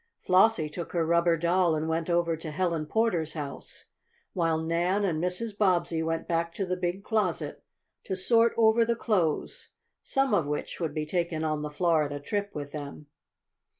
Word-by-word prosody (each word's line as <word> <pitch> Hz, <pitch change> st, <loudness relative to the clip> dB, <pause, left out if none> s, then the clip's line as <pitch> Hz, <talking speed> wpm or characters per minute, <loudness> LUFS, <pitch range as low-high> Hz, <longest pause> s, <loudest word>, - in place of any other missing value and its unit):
Flossie 185 Hz, -3 st, +4 dB
took 170 Hz, +3 st, -7 dB
her 170 Hz, -2 st, +1 dB
rubber 170 Hz, 0 st, +3 dB
doll 170 Hz, 0 st, +2 dB
and 155 Hz, +1 st, -2 dB
went 165 Hz, +1 st, -1 dB
over 170 Hz, -1 st, +2 dB
to 160 Hz, 0 st, -7 dB
Helen 165 Hz, -1 st, -1 dB
Porter's 180 Hz, -7 st, 0 dB
house, 145 Hz, -3 st, -7 dB, 0.5 s
while 165 Hz, -4 st, +1 dB
Nan 170 Hz, +5 st, 0 dB
and 165 Hz, -3 st, -1 dB
Mrs. 200 Hz, +4 st, -2 dB
Bobbsey 180 Hz, -5 st, +1 dB
went 165 Hz, 0 st, -2 dB
back 170 Hz, 0 st, -1 dB
to 195 Hz, -, -1 dB
the 180 Hz, 0 st, -1 dB
big 180 Hz, +2 st, -3 dB
closet 210 Hz, -6 st, -1 dB, 0.4 s
to 190 Hz, -, -2 dB
sort 230 Hz, +5 st, +4 dB
over 225 Hz, 0 st, +5 dB
the 235 Hz, +1 st, 0 dB
clothes, 185 Hz, -10 st, -1 dB, 0.3 s
some 270 Hz, 0 st, 0 dB
of 155 Hz, -, +2 dB
which 150 Hz, 0 st, -4 dB
would 160 Hz, -3 st, -3 dB
be 155 Hz, -1 st, -1 dB
taken 170 Hz, -1 st, -1 dB
on 155 Hz, -1 st, -1 dB
the 150 Hz, -, -4 dB
Florida 150 Hz, -3 st, +1 dB
trip 200 Hz, +8 st, -2 dB
with 145 Hz, -1 st, -5 dB
them. 145 Hz, 0 st, -8 dB
170 Hz, 175 wpm, -28 LUFS, 160-190 Hz, 0.5 s, over